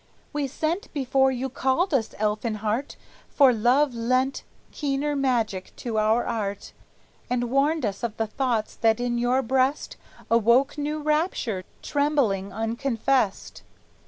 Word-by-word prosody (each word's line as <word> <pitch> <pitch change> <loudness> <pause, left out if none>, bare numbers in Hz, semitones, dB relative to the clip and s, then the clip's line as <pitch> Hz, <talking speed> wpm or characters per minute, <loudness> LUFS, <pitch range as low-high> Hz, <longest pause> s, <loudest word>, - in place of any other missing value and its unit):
"We 290 -1 -1
sent 315 +7 -3
before 265 -1 +2
you 260 +1 -2
called 265 +7 0
us, 235 -5 0
Elfinhart, 215 +3 -1 0.3
For 270 -3 +5
love 250 +5 +3
lent 255 +3 0 0.3
keener 290 0 -1
magic 235 -8 -1
to 225 -3 -2
our 220 +3 +2
art, 205 -4 -4 0.6
And 245 -1 -1
warned 285 +1 +2
us 200 -2 -3
of 235 -3 -3
the 225 - 0
thoughts 230 -1 -1
that 225 0 +2
in 240 -1 -1
your 250 +2 +2
breast 265 +4 0 0.3
Awoke 235 +4 +4
new 300 +1 -3
rapture, 300 - -1 0.2
trembling 275 -10 0
unconfessed." 230 +1 -1
250 Hz, 130 wpm, -25 LUFS, 225-275 Hz, 0.6 s, For